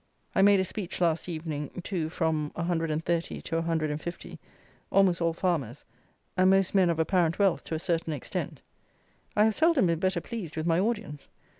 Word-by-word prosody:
_ - - -42 0.3
I 195 - +3
made 200 0 +6
a 190 - +1
speech 185 -1 -5
last 170 0 +1
evening 155 -1 -5
to 170 -5 -2
from 160 -3 -1
130 165 0 -1
to 165 - -4
150, 165 0 -3 0.5
almost 185 -3 +3
all 165 0 +2
farmers, 160 - -2 0.5
and 185 0 +4
most 195 -1 +3
men 190 -3 +4
of 170 - 0
apparent 165 0 +2
wealth 195 -4 +2
to 160 - -3
a - - 0
certain 165 -1 -1
extent. 145 -4 -4 0.7
I 210 - +5
have 220 0 +3
seldom 320 - +3
been 165 -2 +1
better 185 +2 +1
pleased 205 -10 -7
with 155 - -2
my 165 0 +3
audience. 195 -9 -2
170 Hz, 175 wpm, -28 LUFS, 160-190 Hz, 0.7 s, made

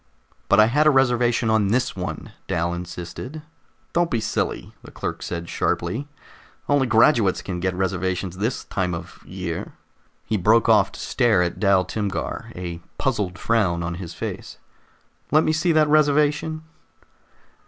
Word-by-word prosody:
"But 100 - +5
I 110 - +8
had 150 +7 +3
a - - +9
reservation 120 -4 +2
on 110 -2 +3
this 120 +6 0
one," - - -5 0.2
Dal 85 -2 0
insisted. 90 - -7 0.5
"Don't 170 0 +2
be 115 - 0
silly," 110 -1 -2
the - - -13
clerk - - -5
said 85 -1 -5
sharply. 135 - -1 0.6
"Only 145 -2 +3
graduates 115 -3 +4
can 90 -2 -4
get 95 +1 -1
reservations 95 -1 -2
this 110 +5 -1
time 90 -2 -2
of 85 - -9
year 90 -3 -5 0.3
" - - -40
He 110 - 0
broke 110 +5 +4
off - - +4
to - - -10
stare 110 -7 +2
at 85 - -3
Dal 100 -3 +3
Timgar, 105 -3 -4
a 85 -2 -5 0.2
puzzled 105 -10 -1
frown 95 -8 +1
on 85 0 -3
his 85 - -8
face. - - -6 0.7
"Let 155 +1 +4
me 155 - +1
see 165 +2 +1
that 155 -1 +4
reservation." 150 +1 +2
110 Hz, 155 wpm, -23 LUFS, 90-135 Hz, 0.7 s, a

